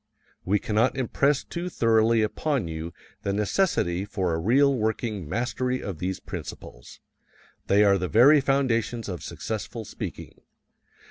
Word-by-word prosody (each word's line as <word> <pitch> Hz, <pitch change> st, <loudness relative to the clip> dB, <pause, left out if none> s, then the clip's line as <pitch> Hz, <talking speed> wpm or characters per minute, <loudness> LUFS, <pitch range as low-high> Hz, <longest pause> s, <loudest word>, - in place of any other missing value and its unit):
We 100 Hz, +3 st, +2 dB
cannot 110 Hz, +6 st, +1 dB
impress 140 Hz, +2 st, +1 dB
too 175 Hz, +1 st, -5 dB
thoroughly 115 Hz, -4 st, +3 dB
upon 130 Hz, -, -1 dB
you 80 Hz, +1 st, -5 dB, 0.3 s
the 100 Hz, -, -2 dB
necessity 100 Hz, -, 0 dB
for 95 Hz, -4 st, -2 dB
a 80 Hz, -, -1 dB
real 135 Hz, +10 st, +4 dB
working 110 Hz, -, -2 dB
mastery 125 Hz, +4 st, -1 dB
of 95 Hz, -6 st, -5 dB
these 95 Hz, +1 st, -3 dB
principles. -, -, -9 dB, 0.7 s
They 100 Hz, +1 st, +5 dB
are 100 Hz, -1 st, +4 dB
the 90 Hz, -, -2 dB
very 135 Hz, -, +6 dB
foundations 120 Hz, -4 st, 0 dB
of 90 Hz, -4 st, -5 dB
successful 110 Hz, +1 st, -5 dB
speaking. -, -, -8 dB
110 Hz, 135 wpm, -26 LUFS, 95-130 Hz, 0.7 s, very